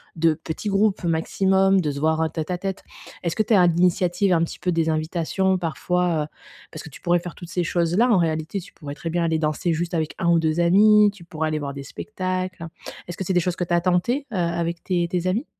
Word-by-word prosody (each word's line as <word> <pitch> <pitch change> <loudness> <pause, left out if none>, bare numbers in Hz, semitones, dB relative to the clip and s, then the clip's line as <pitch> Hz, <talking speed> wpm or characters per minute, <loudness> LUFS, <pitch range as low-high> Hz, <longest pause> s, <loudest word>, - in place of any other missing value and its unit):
de 165 -1 +3
petits 160 +6 -5
groupes 200 0 +1
maximum, 190 +3 +2
de 150 -3 -1
se 140 - -5
voir 160 +1 +1
en 160 - +1
tête 160 +1 -4
à 180 - -1
tête». 190 +1 -5 0.4
Est-ce 170 - -1
que 215 - +2
tu 225 - 0
es - - +7
à 180 -2 +6
l'initiative, 180 +2 +2
un 165 -1 +3
petit - - -5
peu, 180 - 0
des 165 -1 +1
invitations 170 +4 0
parfois, 175 -1 0
heu, - - -6 0.4
parce 155 - -8
que - - -10
tu 145 - -14
pourrais 175 0 +2
faire 175 0 -8
toutes 175 -1 -10
ces 180 0 -1
choses-là 175 +7 +2
en 220 - +5
réalité, 160 +2 -1
tu - - -14
pourrais 145 -2 -8
très 165 - -5
bien 170 +1 0
aller 160 -1 +1
danser 155 +2 0
juste 170 +2 -3
avec 160 -1 -1
1 170 - 0
ou 170 - +5
2 160 0 0
amis, 210 +4 +6
tu 190 -4 -14
pourrais 160 -2 -3
aller 155 0 -1
voir 140 -1 -4
des 140 - -7
spectacles? 185 +1 -4 0.4
Est-ce 175 - -7
que 190 - -3
c'est 190 - -1
des 180 - +4
choses 175 0 -1
que - - -2
tu 175 0 -2
as 170 - +3
tenté, 185 +11 0
heu, - - -3
avec 170 -1 -1
tes 175 -2 0
tes 180 0 -2
amis? 210 +10 0
175 Hz, 255 wpm, -23 LUFS, 160-185 Hz, 0.4 s, es